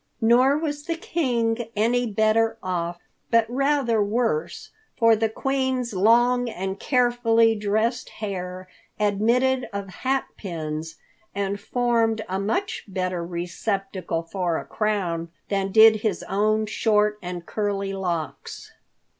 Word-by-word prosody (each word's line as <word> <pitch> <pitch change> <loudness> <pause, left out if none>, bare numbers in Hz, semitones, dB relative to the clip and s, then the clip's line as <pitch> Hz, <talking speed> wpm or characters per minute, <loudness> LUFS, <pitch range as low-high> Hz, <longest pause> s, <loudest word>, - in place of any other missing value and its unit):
Nor 250 +5 +4
was 295 -2 -3
the 335 - 0
King 240 -9 -1
any 240 +3 +2
better 220 +2 +2
off, 175 -2 -2 0.3
but 230 -1 +4
rather 260 -3 +1
worse, 235 - -1 0.3
for 230 -2 +5
the 220 +1 0
Queen's 260 0 -1
long 240 +5 +3
and 190 -1 -4
carefully 240 -3 +3
dressed 220 +4 -1
hair 185 -3 -6 0.3
admitted 235 +5 +2
of 200 -1 -5
hat 265 +7 -1
pins 160 -3 -5 0.4
and 200 0 -2
formed 230 -1 0
a 190 +1 -2
much 365 - -2
better 185 -3 -2
receptacle 180 0 -3
for 170 -1 -2
a - - -6
crown 180 -6 -1 0.2
than 195 -1 -1
did 220 +1 +7
his 210 -4 -2
own 215 +2 +1
short 210 -1 +1
and 180 -1 -6
curly 200 -2 -2
locks. 175 -5 -4
215 Hz, 120 wpm, -24 LUFS, 190-240 Hz, 0.4 s, did